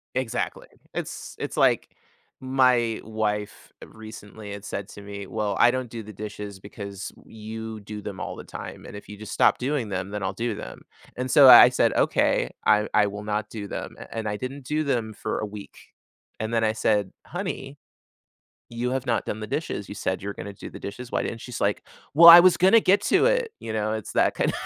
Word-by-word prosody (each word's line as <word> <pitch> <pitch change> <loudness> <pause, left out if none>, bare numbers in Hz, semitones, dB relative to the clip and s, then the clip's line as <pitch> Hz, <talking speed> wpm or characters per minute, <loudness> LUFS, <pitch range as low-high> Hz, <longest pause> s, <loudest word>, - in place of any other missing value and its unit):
Exactly. 130 -3 -3 0.3
It's - - -6
it's - - -5
like - - +3 0.5
my 125 -3 +2
wife 105 -1 -3
recently 110 -1 -11
had 100 -1 -7
said 100 -1 -5
to 100 - -11
me, 100 0 -8
"Well, 105 -1 -2
I 120 - +6
don't 130 -1 -3
do 115 -1 -7
the 105 +1 -11
dishes 105 -1 -7
because 100 -1 -8
you 110 0 -7
do 105 +1 -8
them 100 -3 -7
all - - -5
the - - -9
time, - - -9
and - - -10
if 105 - -11
you 105 - -9
just 110 0 -9
stop - - +4
doing 130 -3 -2
them, 95 -1 -3
then 105 - -4
I'll 95 - -2
do 115 +3 -2
them." - - -9 0.3
And 130 +1 -3
so, 135 -1 +8
I 125 - +11
said, 125 - +2
"Okay. - - +1
I 105 0 +4
I 105 -1 +4
will 105 +1 -6
not 105 0 -2
do 105 -3 -6
them." - - -6
A - - -11
And 110 -1 -3
I 105 - -3
didn't 135 +3 -6
do 150 +3 -1
them 120 -6 -1
for - - -4
a - - -2
week; 105 -1 -10 0.6
and 110 +1 -3
then 115 -1 +2
I 110 0 +2
said, 105 -3 +1
"Honey, 175 -6 -5 0.9
you 120 +1 -2
have 130 -1 -2
not 115 -2 0
done 105 - -4
the 110 - -5
dishes, 105 -6 -4
you - - -7
said 95 -2 -2
you 100 - -5
were 100 - -4
gonna 100 - -7
do - - -9
the - - -11
dishes. 120 +5 -7
Why - - 0
didn't" 115 - -5
She's 125 - -7
like, - - 0 0.3
"Well, 170 +3 +9
I 170 +1 +12
was 185 0 +5
gonna 190 +5 +6
get 195 0 +4
to 380 - +3
it." - - +1
You 115 - -5
know? 110 0 -1
It's 110 -1 -5
that - - +2
kind - - 0
110 Hz, 220 wpm, -25 LUFS, 105-125 Hz, 0.9 s, I